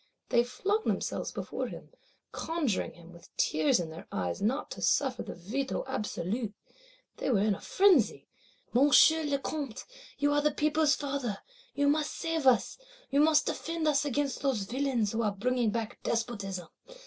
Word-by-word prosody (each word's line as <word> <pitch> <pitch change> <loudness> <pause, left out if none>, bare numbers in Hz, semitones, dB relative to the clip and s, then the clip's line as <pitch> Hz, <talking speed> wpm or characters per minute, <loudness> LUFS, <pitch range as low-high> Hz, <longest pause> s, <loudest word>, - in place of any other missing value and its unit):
They 235 - +4
flung 400 - -1
themselves - - -1
before - - -4
him; - - -10 0.4
conjuring 315 - -2
him 170 0 -14
with 170 - -15
tears 155 +3 +2
in 165 -2 -4
their 160 - -10
eyes 90 -2 -2
not 240 +8 -1
to - - -7
suffer 265 -3 +1
the - - -7
Veto 245 +10 -3
Absolu. 215 -3 -3 0.6
They - - -2
were 215 -6 +3
in 215 -1 +3
a 195 - -7
frenzy: 375 - +3 0.5
'Monsieur 290 +5 +6
le 285 -2 0
Comte, 275 -4 -5 0.3
you 290 0 +2
are 290 - +3
the 300 - +3
people's 300 0 +2
father; 275 -7 -3 0.4
you 285 0 +2
must 300 +1 +1
save 325 -4 -1
us; 255 - +3 0.3
you 280 - +3
must 305 0 +5
defend 330 -1 -2
us 290 -1 +3
against 285 0 -1
those 265 -7 0
villains 245 -1 0
who 230 - -1
are 210 -3 0
bringing 245 +2 +1
back 220 0 -4
Despotism. 195 -7 -3
260 Hz, 165 wpm, -30 LUFS, 210-290 Hz, 0.6 s, Monsieur